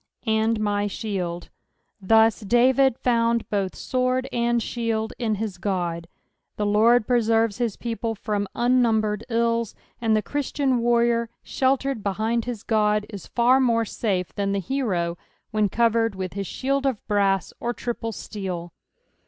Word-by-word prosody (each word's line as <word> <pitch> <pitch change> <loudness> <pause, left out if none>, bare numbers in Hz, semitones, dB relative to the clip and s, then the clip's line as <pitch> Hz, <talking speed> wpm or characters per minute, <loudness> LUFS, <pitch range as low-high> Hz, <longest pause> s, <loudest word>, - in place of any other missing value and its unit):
" - - -49
And 220 0 +1
mj/ 205 0 -2
ikidd." 175 -1 -4 0.5
Thus 220 +2 +4
l5avid 255 +4 +3
found 235 -1 +1
buth 195 -3 -1
sword 255 0 0
and 235 0 +1
shield 225 -1 -2
in 225 -3 0
his 205 -3 -4
Qod. 175 -4 -2 0.5
The 210 - 0
Lord 215 +3 +4
preserveB 225 -2 +2
his 235 -4 0
people 230 -1 -3
from 205 -1 -2
unnumbered 225 -4 +2
ills; 230 -1 0 0.3
and 225 -2 +2
the 215 - +1
Christian 280 -2 0
warrior, 235 0 +2
sheltered 270 -2 0
behind 220 +4 -1
bis 235 -4 -4
God, 210 -1 +2
is 200 -4 -8
far 250 +2 +3
more 230 -3 +2
safe 190 -5 -2
than 200 -1 -1
the 200 - 0
hero 185 -8 -1 0.3
when 215 -2 +1
covered 230 -1 +2
with 185 -1 -4
bis 195 -1 -4
shield 275 +1 -1
of 255 -6 -2
brass 195 -3 +1
or 240 - -1
triple 235 -1 -4
steel. 185 -5 -6
225 Hz, 145 wpm, -24 LUFS, 205-240 Hz, 0.5 s, Thus